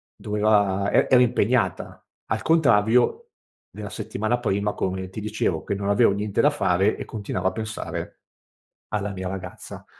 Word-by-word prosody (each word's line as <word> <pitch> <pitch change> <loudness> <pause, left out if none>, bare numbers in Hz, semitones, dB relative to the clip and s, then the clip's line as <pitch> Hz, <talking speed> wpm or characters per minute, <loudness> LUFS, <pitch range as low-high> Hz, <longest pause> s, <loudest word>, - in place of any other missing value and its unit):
doveva 105 -2 +1
e - - +3
era 125 -1 +6
impegnata, 125 0 0 0.2
al 110 - -2
contrario 125 - +3 0.4
della - - -8
settimana 110 +3 -2
prima, 105 -3 -1
come 95 0 -3
ti 100 +3 -7
dicevo 110 +1 -1
che - - -3
non 100 0 -4
avevo 100 0 +4
niente 100 0 -1
da 145 - +5
fare, 100 -8 +1
e - - -6
continuavo 100 -3 -3
a - - +2
pensare 110 0 -5 0.7
alla 105 -1 -2
mia 95 -1 -5
ragazza. 95 -1 -8
105 Hz, 150 wpm, -24 LUFS, 100-115 Hz, 0.7 s, era